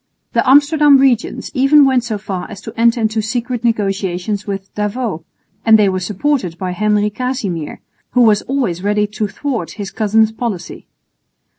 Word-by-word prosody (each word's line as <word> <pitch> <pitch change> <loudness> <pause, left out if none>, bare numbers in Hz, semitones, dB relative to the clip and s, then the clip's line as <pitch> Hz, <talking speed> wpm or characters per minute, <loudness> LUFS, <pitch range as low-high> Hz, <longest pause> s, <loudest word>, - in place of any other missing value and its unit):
The - - +1
Amsterdam 290 +1 +5
regents 260 -4 0
even 280 +1 +5
went 260 -3 +2
so 225 -3 -3
far 195 -3 -5
as - - -9
to - - -9
enter 235 +1 +3
into 220 0 0
secret 240 +2 -3
negotiations 200 -3 -1
with 195 -1 -5
D'Avaux; 210 -4 -3 0.4
and 220 -1 +6
they 205 -2 +3
were 185 0 -1
supported 195 - -2
by 185 0 -3
Henry 210 +2 +1
Casimir, 205 - -4 0.3
who 250 - +4
was 215 -3 +4
always 240 -11 -1
ready 210 +1 +1
to 210 +1 -3
thwart 230 - -4
his 200 -3 -6
cousin's 220 0 +2
policy. 220 -5 -5
215 Hz, 160 wpm, -16 LUFS, 195-250 Hz, 0.4 s, and